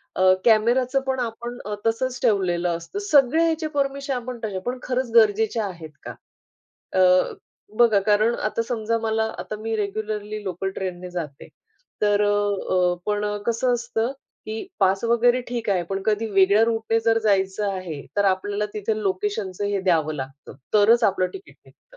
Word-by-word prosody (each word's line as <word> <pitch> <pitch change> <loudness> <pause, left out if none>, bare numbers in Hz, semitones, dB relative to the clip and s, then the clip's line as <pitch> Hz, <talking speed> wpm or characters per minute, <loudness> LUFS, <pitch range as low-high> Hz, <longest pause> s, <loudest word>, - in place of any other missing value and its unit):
अ, 185 0 +5
कॅमेराचं 245 +4 +3
पण 260 -1 0
आपण 240 0 -4
अ, 210 0 -3
तसंच 250 +3 0
ठेवलेलं 175 -4 +1
असतं. 170 - -7
सगळ्या 315 -4 +4
ह्याचे 320 -1 0
परमिशन 275 0 -1
आपण 250 -1 -5
तशा 200 -3 -3
पण 250 +1 -2
खरंच 250 -1 -2
गरजेच्या 220 0 +3
आहेत 170 -5 -7
का? - - -7 0.9
अ, - - +6 0.8
बघा 230 -4 +5
कारण 215 +3 +3
आता 230 - -2
समजा 230 -1 -1
मला 220 0 0
आता, 215 - -5
मी 225 +1 -3
रेग्युलरली 210 0 -3
लोकल 190 0 -3
ट्रेन 185 -2 -4
ने 180 0 -8
जाते, 160 -6 -6 0.5
तर 205 0 +3
अ, 200 -3 +1
पण 210 0 0 0.2
कसं 240 +2 +1
असतं 240 +1 -2 0.3
की 220 +8 -5
पास 195 0 +2
वगैरे 240 +2 +3
ठीक 235 -3 -4
आहे. 185 -3 +1
पण 195 0 -2
कधी 215 +1 +1
वेगळ्या 200 +3 +5
रूट 225 -1 -1
ने 225 - +4
जर 225 0 +3
जायचं 200 -1 +1
आहे. 180 -6 -5 0.2
तर 205 - +3
आपल्याला 200 +2 0
तिथे 215 +1 -1
लोकेशनचं 200 0 -2
हे 200 -1 -1
द्यावं 160 -4 +1
लागतं. 135 0 -8 0.2
तरच 225 +3 +5
आपलं 185 -2 +2
तिकीट 390 0 -11
निघतं. - - -22
215 Hz, 165 wpm, -23 LUFS, 195-235 Hz, 0.9 s, अ